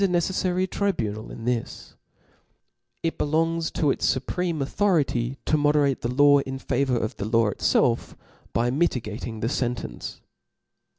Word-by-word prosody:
^ - - -5
ceflary 180 +1 +1
tribunal 115 - -2
in 115 - -8
this; 120 -2 -3 1.1
it 165 - -2
belongs 165 +2 +1
to 145 -3 +1
its - - +1
fupreme 165 +5 -2
authority 135 - +1
to 155 - +2
moderate, 145 -2 +2
the 120 - -2
law 145 +2 +6
in 135 -1 -4
favour 130 -1 0
pf 110 - -3
the 100 - -3
law 115 -1 +2
itfelf, - - +1 0.4
by 120 +1 +1
mitigating 115 -6 -2
the 115 - 0
fentence. 120 - -3
135 Hz, 135 wpm, -25 LUFS, 120-165 Hz, 1.1 s, law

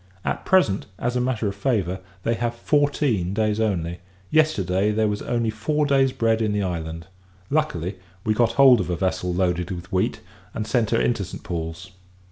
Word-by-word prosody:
At - - -2
present, 115 - +3
as 125 +1 -2
a 125 - +1
matter 125 -4 0
of 100 - -2
favour, 100 -4 -1 0.2
they 115 - +1
have 120 +1 -2
fourteen 140 - +1
days 110 0 +1
only. 90 -6 -1 0.3
Yesterday, 105 - +2
there 110 +1 +2
was 105 0 -2
only 115 -2 0
four 150 +8 0
days 135 -2 +3
bread 115 -2 +1
in 105 -2 +1
the 105 -1 0
island. 85 -2 -4 0.5
Luckily, 100 - -1 0.3
we 110 - +2
got 115 +1 +2
hold 130 -4 +7
of 90 - -4
a 90 - 0
vessel 90 0 -1
loaded 90 -1 0
with 95 +1 -6
wheat, 95 -1 0 0.3
and 110 - -2
sent 115 -2 +1
her 115 - +2
into 115 -4 +1
St. 95 - -8
Paul's. 85 +1 -5
105 Hz, 185 wpm, -23 LUFS, 90-120 Hz, 0.5 s, hold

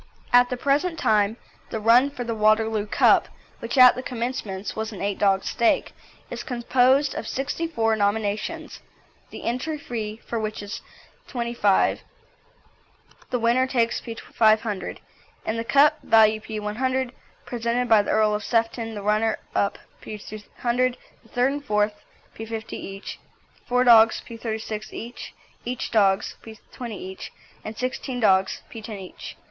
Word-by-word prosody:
At 245 0 +6
the 250 - -2
present 295 +6 +1
time 215 -3 +2 0.3
the 220 - -3
run 235 +5 +5
for 250 -3 -6
the 230 -1 -3
Waterloo 215 0 +2
Cup, - - +4 0.3
which 235 +4 -4
at 255 -1 +9
the 255 - -5
commencement 235 -6 -4
was 220 0 -3
an 205 - -8
eight 200 0 -2
dog 195 -1 +3
stake, 235 -2 +1 0.4
is - - -4
composed 255 +3 +2
of 220 - -5
sixty 285 +5 -2
four 225 -8 +1
nominations, 215 +9 -2 0.5
the - - -9
entry 260 +7 -2
fee 225 -6 -5
for 230 - -2
which 215 -1 -4
is 205 +3 -6 0.5
P25. 235 -5 +1 1.3
The 250 - 0
winner 240 +2 +2
takes 235 -3 +1
P500, 220 -2 0 0.5
and 225 +1 -1
the - - -1
cup, 280 +5 +4
value 220 -1 +5
P100, 240 +5 -2 0.3
presented 240 +1 -1
by 220 -2 +6
the - - -6
Earl 215 -1 +3
of 210 0 -2
Sefton, 225 0 -1
the 205 - -6
runner 215 +2 +1 0.2
up 200 - 0 0.2
P200, 235 +4 -3 0.3
the 225 - -23
third 250 +4 +2
and 285 0 -4
fourth 210 -4 +1 0.4
P50 225 0 -6
each, 195 +1 -7 0.5
four 250 0 +3
dogs 225 -2 +6
P36 220 -2 -5
each, 235 +2 -8 0.3
eight 250 0 -3
dogs 195 -3 +2
P20 225 +2 -9
each, 190 -1 -8 0.3
and 215 0 -7
sixteen 255 0 -3
dogs 190 -4 +2
P10 220 -2 -7
each. 185 -1 -9
225 Hz, 140 wpm, -24 LUFS, 215-245 Hz, 1.3 s, at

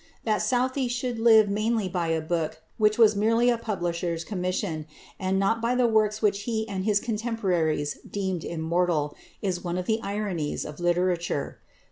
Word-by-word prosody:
That 215 -2 +1
Southey 255 +1 +1
should 245 -1 -2
live 220 -2 +6
mainly 215 +1 0
by 175 -2 -2
a 165 -1 0
book 160 -1 -2 0.2
which 215 0 +3
was 220 -3 +6
merely 230 +4 +3
a 235 - +1
publisher's 175 -6 -2
commission, 180 -4 -3 0.3
and 190 -1 0
not 225 +4 +1
by 235 +2 +1
the 250 -1 +3
works 215 -1 +2
which 200 -1 +2
he 220 -1 -1
and 190 -2 -3
his 210 -2 +3
contemporaries 190 -11 -1
deemed 190 -4 -2
immortal, 165 -2 0 0.3
is 185 -3 -1
one 175 0 -2
of 180 - -2
the 220 +2 +1
ironies 200 -8 -2
of 150 +1 -8
literature. 175 -3 0
200 Hz, 165 wpm, -26 LUFS, 175-220 Hz, 0.3 s, live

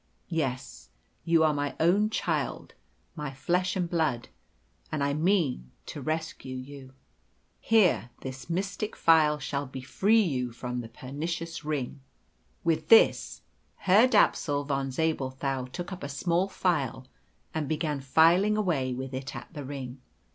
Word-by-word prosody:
Yes, 130 - -3 0.4
you 165 -1 +4
are 155 -1 +4
my 145 -1 -2
own 195 +6 +3
child, 220 - -2 0.4
my 150 -3 -4
flesh 180 +7 0
and 180 -2 0
blood, 155 -8 -1 0.6
and 150 -2 -1
I 140 0 +1
mean 155 - +1 0.2
to - - -7
rescue 155 -4 -4
you. 130 0 -9 0.7
Here, 185 - +3
this 130 +3 -7
mystic 195 +4 -2
file 155 -2 +4
shall 140 -1 -3
befree 140 - +1
you 125 - -2
from 125 +1 -4
the 115 - -9
pernicious 165 +7 -5
ring." 145 -2 -3 0.6
With 160 -2 0
this, 225 - +5 0.3
Herr 200 +6 +5
Dapsul 150 - +2
von 135 -1 -1
Zabelthau 135 -3 -1
took 175 +9 -6
up 185 - -8
a 140 - -5
small 170 +6 0
file 145 -10 -1 0.5
and 155 -3 -2
began 150 -3 -1
filing 170 +10 +4
away 145 -11 0
with 130 +1 -6
it 130 +1 -5
at 120 +7 -9
the 145 -3 -6
ring. 130 -2 -7
150 Hz, 140 wpm, -28 LUFS, 130-170 Hz, 0.7 s, this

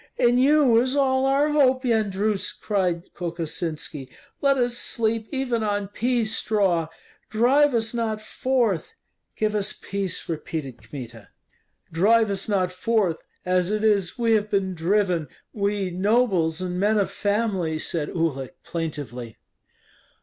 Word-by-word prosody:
"In 245 0 +4
you 270 -3 +5
is 260 +2 -1
all 265 -1 +2
our 280 +2 +3
hope, 265 -3 +3
Yendrus," 215 -3 0
cried 180 -4 -1
Kokosinski, 165 -4 -4 0.3
"Let 275 -1 +3
us 245 -1 0
sleep 225 -2 -1
even 260 -4 -1
on 205 -2 -1
pea 240 +2 0
straw; 200 -6 +1 0.4
drive 260 +5 +3
us 225 0 0
not 225 -2 -1
forth." 245 - -1 0.4
"Give 215 -1 0
us 205 -2 -1
peace," 195 -2 -3
repeated 155 -5 -5
Kmita. 120 -6 -9 0.6
"Drive 210 +6 +3
us 195 +2 -3
not 185 -3 +1
forth; 185 -3 +1 0.3
as 180 0 +1
it 215 0 -1
is, 205 -3 +2
we 230 -2 +1
have 215 -1 +2
been 195 -2 0
driven, 180 -1 +1 0.3
we 200 -2 -1
nobles 185 -4 +1
and 180 -1 -3
men 210 +2 +2
of 200 - +1
family," 200 -6 0
said 155 -1 -1
Uhlik, 145 -7 -2
plaintively. 140 -9 -5
205 Hz, 135 wpm, -24 LUFS, 175-230 Hz, 0.6 s, you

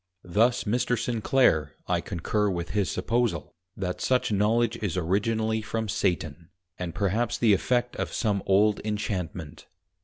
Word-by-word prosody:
Thus 115 +7 +2
Mr. 120 +3 0
Sinclare, 115 - +2
I - - +1
concur 105 +4 -1
with 85 -2 -3
his 100 -2 0
supposal, 115 0 -1 0.2
that 90 -2 -3
such 125 -3 +1
Knowledge 115 +3 +2
is 100 -5 -3
originally 110 +5 0
from 110 +1 -3
Satan, 85 -6 -2 0.3
and 90 -2 -4
perhaps 105 +4 0
the 110 -3 +4
Effect 125 +4 +1
of - - -2
some 105 -4 0
old 100 +2 +4
Inchantment. 95 -7 -4
105 Hz, 135 wpm, -27 LUFS, 90-115 Hz, 0.3 s, the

